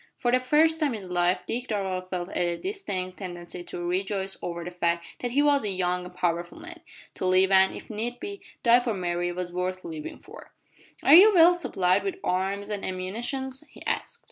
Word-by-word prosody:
For 240 - 0
the 255 - +4
first 310 +5 +3
time 290 -6 +1
in 215 - -6
his 185 -2 -9
life 175 +1 +2
Dick 245 +6 -3
Darvall 190 -3 -2
felt 180 0 -4
a 175 -1 0
distinct 190 - -4
tendency 175 -2 -7
to 175 - -5
rejoice 190 +1 -1
over 170 -1 -4
the 175 - -6
fact 170 -1 -1
that 245 - -2
he 280 +4 +2
was 285 -3 +3
a 210 - 0
young 180 -1 -1
and 180 0 -11
powerful 175 -1 -1
man! 340 0 -10 0.3
To 185 - -2
live 185 +1 +4
and, 190 0 +5
if - - -9
need 235 +3 -4
be, 400 +6 -7 0.2
die 235 0 +6
for 240 -3 -2
Mary 175 -1 -1
was 175 0 -5
worth 185 +1 -3
living 155 -2 -6
for! - - -14 0.5
"Are 280 - +6
you 390 +6 +10
well 345 +1 +8
supplied 190 - +1
with 195 - -2
arms 195 +3 -1
an' 205 -1 -3
ammunition?" 225 +9 -3 0.2
he - - -14
asked. 470 - -2
190 Hz, 205 wpm, -26 LUFS, 180-245 Hz, 0.5 s, you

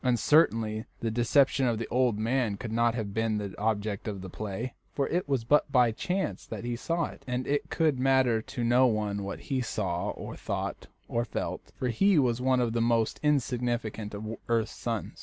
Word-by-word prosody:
And 125 -2 +3
certainly 110 -5 +3 0.2
the 115 -1 -1
deception 130 +3 +3
of 115 -2 +1
the 115 - -4
old 125 -3 +2
man 115 -1 0
could 110 0 -6
not 115 +1 +2
have 105 -4 -3
been 110 0 0
the 100 -2 -4
object 105 -1 -1
of 100 -3 -4
the 95 -1 -8
play, 110 +4 -4 0.2
for 140 - -1
it 175 -3 -1
was 135 -4 +1
but 145 +4 +3
by 125 -3 +5
chance 185 - -2
that - - -6
he 120 0 -2
saw 165 +7 -1
it, - - -10
and 125 0 -2
it 145 0 -1
could 155 -6 +1
matter 130 -3 +3
to 120 +2 -5
no 125 +2 +5
one 105 -3 -1
what 100 - -5
he 135 -2 -1
saw 95 -7 -2
or - - -6
thought - - -4 0.2
or 115 - 0
felt, 120 - -4
for 125 - -1
he 195 - +3
was 125 -4 +2
one 130 0 +3
of 120 -2 +1
the 115 - +1
most 115 -1 +1
insignificant 120 -7 -1
of 105 +2 -6 0.2
earth's 115 -2 +1
sons. 115 -3 -4
120 Hz, 205 wpm, -29 LUFS, 110-130 Hz, 0.2 s, by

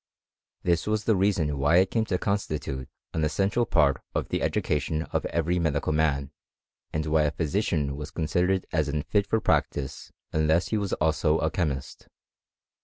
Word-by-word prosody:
This 85 +1 +1
was 105 0 0
the 110 - +3
reason 90 -7 +1
why 75 +4 +3
it 95 +1 +4
came 115 -1 +1
to 95 -4 0
constitute 75 -10 -2 0.2
an 80 - 0
essential 100 +9 +1
part 75 -4 +3
of - - -1
the - - -1
education 75 +2 0
of - - -1
every 85 +2 0
medical 80 -2 0
man, 75 -3 +1 0.6
and 80 -1 -2
why 80 0 +3
a 75 - +3
physician 75 -4 -1
was 75 +1 -6
con 80 - -3
sidered 90 +3 +1
as 80 -2 +1
unfit 75 +8 0
for 110 - +2
practice 70 -9 -1 0.2
unless 80 +2 +2
he 110 - +1
was 100 -2 -2
also 80 0 +2
a 80 - 0
chemist. 75 -7 -3
80 Hz, 170 wpm, -27 LUFS, 75-95 Hz, 0.6 s, it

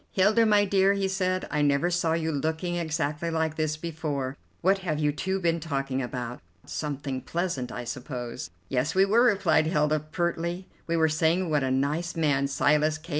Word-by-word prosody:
"Hilda, 215 +4 +4
my 205 -1 +4
dear," 195 0 +3
he 200 -1 0
said, 185 -1 -1
"I 150 - +1
never 145 +4 +2
saw 170 -2 +1
you 160 -1 0
looking 160 +4 -2
exactly 160 -1 -1
like 160 -1 -1
this 155 -1 -1
before. 150 -5 -3 0.3
What 195 +2 +3
have 170 -5 -2
you 150 -1 +1
two 190 +6 -2
been 170 -2 +1
talking 135 -4 -2
about? 125 -1 -5 0.3
Something 140 -3 -4
pleasant, 155 -4 -2
I 125 - -5
suppose." 120 -4 -5 0.2
"Yes, 135 +5 -1
we 190 +1 +5
were," 220 +4 +4
replied 190 -9 +3
Hilda 150 -2 +2
pertly; 170 +3 -2 0.2
"we 170 0 +1
were 160 -1 +4
saying 160 +3 +1
what 150 -1 +2
a 130 - 0
nice 145 +7 0
man 145 -4 +2
Silas 150 +3 +2
K. 160 +2 -16
160 Hz, 180 wpm, -27 LUFS, 145-175 Hz, 0.3 s, we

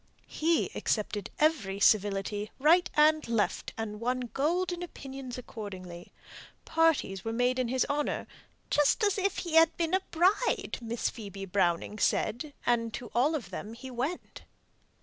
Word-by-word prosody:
He 330 +1 0
accepted 210 -1 -1
every 225 -12 +1
civility 205 0 +2
right 330 +6 +4
and 310 -1 +4
left, 230 -3 0
and 210 -2 -4
won 245 0 -2
golden 350 +5 0
opinions 270 -7 -7
accordingly. 185 -7 -8 0.5
Parties 320 -12 +2
were 225 - -2
made 245 +2 +1
in 255 - +1
his 255 +2 +1
honour, 290 +1 -1 0.5
"just 295 - +3
as 405 -1 +2
if 390 0 0
he 340 -3 -4
had 325 0 +5
been 335 0 -1
a 380 - +3
bride," 370 +8 +1
Miss 230 0 -2
Phoebe 200 -3 -7
Browning 185 +2 0
said; 240 +10 0
and 230 -1 +1
to 245 - -8
all 280 +7 +3
of 225 -11 -5
them 210 +4 -6
he 260 +2 -9
went. 270 +9 -4
250 Hz, 150 wpm, -29 LUFS, 210-315 Hz, 0.5 s, had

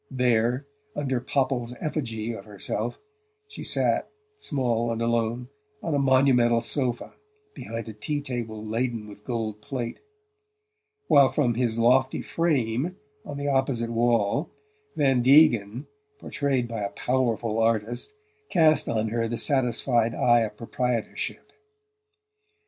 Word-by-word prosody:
There, 125 0 +1 0.3
under 135 -4 -1
Popple's 130 -3 -1
effigy 115 -7 -3
of 100 -3 -9
herself, 105 +2 -4 0.5
she 415 - -9
sat, - - +1 0.3
small 120 - -1
and 115 - -3
alone, 115 +1 -1 0.3
on 165 - -2
a 145 - +2
monumental 130 -3 +4
sofa 120 -1 0 0.4
behind 115 - -6
a 110 - -7
tea 145 +8 -2
table 120 -6 -5
laden 115 0 -2
with 105 0 -13
gold 110 -3 -4
plate; 125 -2 -5 1.1
while 140 -2 +6
from 130 -2 +1
his 115 -1 0
lofty 130 +3 +3
frame, 150 -1 0 0.3
on 145 - -7
the 145 0 -3
opposite 135 -4 0
wall 115 - +1 0.5
Van 135 -4 +3
Degen, 125 -4 +4 0.3
portrayed 140 - -1
by 115 -2 -5
a 100 - -2
"powerful" 120 -3 -1
artist, 115 - 0 0.4
cast 155 -2 +4
on 110 -1 0
her 115 +1 -1
the 120 +1 -3
satisfied 120 -4 +2
eye 120 -1 +4
of 105 -2 -3
proprietorship. 120 0 -3
120 Hz, 125 wpm, -26 LUFS, 115-135 Hz, 1.1 s, while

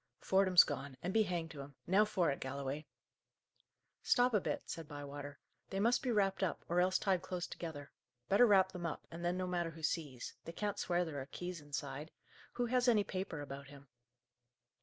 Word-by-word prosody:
"Fordham's 190 -2 +6
gone, 140 -1 -5
and 180 +2 -1
be 225 - +5
hanged 175 -5 -1
to 145 - -7
him! 140 0 -10
Now 200 +4 +5
for 190 -7 +1
it, 140 - -3
Galloway!" 140 +2 -4 1.1
"Stop 245 -1 +4
a 210 - +4
bit," - - -2
said 165 -2 -5
Bywater. 145 -1 -7 0.3
"They 195 - -2
must 235 +4 +3
be 260 - -2
wrapped 195 -4 +2
up, 190 - -1
or 175 +1 +3
else 185 +1 +3
tied 190 -3 +1
close 180 -1 -3
together. 150 -4 -7 0.4
Better 240 +5 +6
wrap 190 -3 +5
them 175 -2 -3
up, 160 - -5
and 170 +1 -7
then 175 +1 +1
no 185 - -1
matter 175 -2 -1
who 160 0 -11
sees. 145 -6 -2
They 165 - -7
can't 205 +2 -2
swear 175 0 +1
there 145 -4 -4
are 130 - -7
keys 180 +1 -5
inside. 145 0 -5 0.4
Who 245 - 0
has 250 +1 +2
any 220 -4 +5
paper 185 -6 -4
about 140 0 -7
him?" 140 -1 -14
175 Hz, 200 wpm, -36 LUFS, 145-195 Hz, 1.1 s, Fordham's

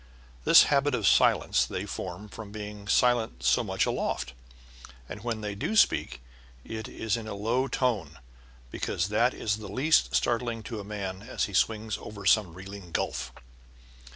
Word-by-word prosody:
This - - +9
habit 140 -1 +2
of 110 -5 -2
silence - - +4
they - - -4
form 105 - -6
from 105 0 -9
being 105 -1 -8
silent 115 - +2
so 65 0 +3
much - - 0
aloft. - - -2 0.7
And 105 - -8
when 115 -2 -3
they 105 -1 -3
do 105 - -3
speak 220 - +3 0.4
it 110 -1 -6
is 110 -2 -2
in 115 -2 -6
a 105 - -5
low 115 +6 0
tone, 125 -10 -1 0.5
because 90 +3 -2
that 120 +4 +2
is 105 -1 -1
the 110 -2 -8
least 140 +10 +2
startling 120 -1 0
to 110 0 -6
a - - -6
man 100 -2 -5
as 115 +5 -3
he 100 - -9
swings 110 +2 0
over 100 -2 -9
some 95 -6 +3
reeling 95 -1 -10
gulf. - - -2
105 Hz, 165 wpm, -28 LUFS, 100-115 Hz, 0.7 s, This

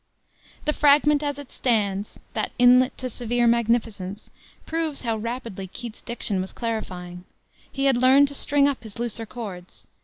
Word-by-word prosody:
The 300 - +2
fragment, 295 0 +4
as 290 -2 -2
it 285 -2 -10
stands 205 -5 -1 0.2
"that - - -2
inlet 250 +1 +5
to 255 - -3
severe 240 0 -1
magnificence" 225 -4 0 0.3
proves 320 -3 -2
how 230 -2 0
rapidly 230 -4 -5
Keats's 230 +4 -9
diction 215 -5 -2
was 190 - -6
clarifying. 180 -6 -5 0.5
He 275 0 -2
had 270 -3 +4
learned 265 +3 +6
to - - -6
string 280 0 +3
up 280 -3 -2
his 220 -3 -11
looser 230 -1 -3
chords. 195 -7 -8
235 Hz, 155 wpm, -24 LUFS, 210-270 Hz, 0.5 s, learned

